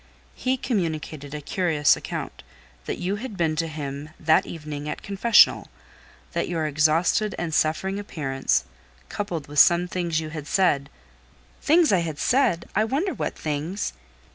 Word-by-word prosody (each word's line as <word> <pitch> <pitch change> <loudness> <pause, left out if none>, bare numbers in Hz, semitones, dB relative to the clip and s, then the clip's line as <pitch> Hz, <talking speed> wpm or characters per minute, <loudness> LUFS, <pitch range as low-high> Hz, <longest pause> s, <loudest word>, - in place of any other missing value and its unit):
"He 260 +1 -1
communicated 160 - -3
a 150 - -5
curious 155 -2 +2
account; - - -6 0.4
that - - -3
you 190 +3 -2
had 220 -2 -7
been 160 -3 +1
to 165 +1 0
him 145 -1 -6
that 160 0 +3
evening 150 -2 -6
at - - -5
confessional; 200 +4 +4 0.6
that - - -1
your 165 -3 -1
exhausted 160 +8 +2
and 170 -2 -3
suffering 190 +6 +1
appearance, 135 - -1 0.5
coupled 175 -8 -4
with 145 0 0
some 175 +1 +6
things 170 -3 -1
you 155 -1 -5
had 155 -2 -7
said—" 145 -8 +2 0.7
"Things 325 +1 +4
I 190 - +4
had 160 -3 -3
said? 245 - +2
I 215 - +3
wonder 290 - -1
what - - -4
things!" 155 - -3
165 Hz, 150 wpm, -24 LUFS, 150-195 Hz, 0.7 s, some